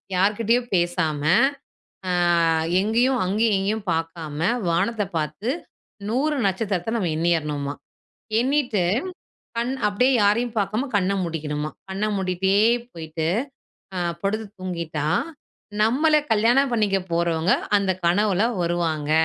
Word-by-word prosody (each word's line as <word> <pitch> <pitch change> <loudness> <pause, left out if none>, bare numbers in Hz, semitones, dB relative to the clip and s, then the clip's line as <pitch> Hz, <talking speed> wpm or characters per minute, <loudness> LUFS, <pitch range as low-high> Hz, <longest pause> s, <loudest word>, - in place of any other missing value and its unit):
யார் 195 +3 +3
கிட்டயும் 235 +2 +1
பேசாம, 175 -4 0 0.9
ஆ - - -1 0.7
எங்கேயும் 240 +5 +2
அங்கேயும் 210 +3 +2
எங்கேயும் 205 +2 -2
பார்க்காம, 165 -2 -4 0.3
வானத்தை 200 +6 0
பார்த்து 155 +8 -3 0.6
100 275 +7 0
நட்சத்திரத்த 195 +1 -1
நம்ம 185 -6 -1
எண்ணியரணுமா. 150 -4 0 0.7
எண்ணிட்டு, 255 -5 +1 0.8
கண் 240 +3 0
அப்படியே 250 +6 +2
யாரையும் 230 +4 +1
பார்க்காம 215 +7 -1
கண்ண 190 -1 +2
மூடிக்கணுமா. 150 -3 -3 0.2
கண்ண 195 +2 -2
மூடிட்டே 190 0 0 0.4
போயிட்டு 160 -1 -4 0.7
அ - - -1 0.2
படுத்து 215 +2 -1
தூங்கிட்டா, 170 -5 -3 0.8
நம்மள 295 +8 +3 0.2
கல்யாணம் 240 +5 +3
பண்ணிக்க 210 -4 +2
போறவங்க 170 +1 +1 0.2
அந்த 200 -2 +1
கனவுல 195 +2 +2 0.2
வருவாங்க 165 -3 -1
195 Hz, 105 wpm, -23 LUFS, 170-225 Hz, 0.9 s, யார்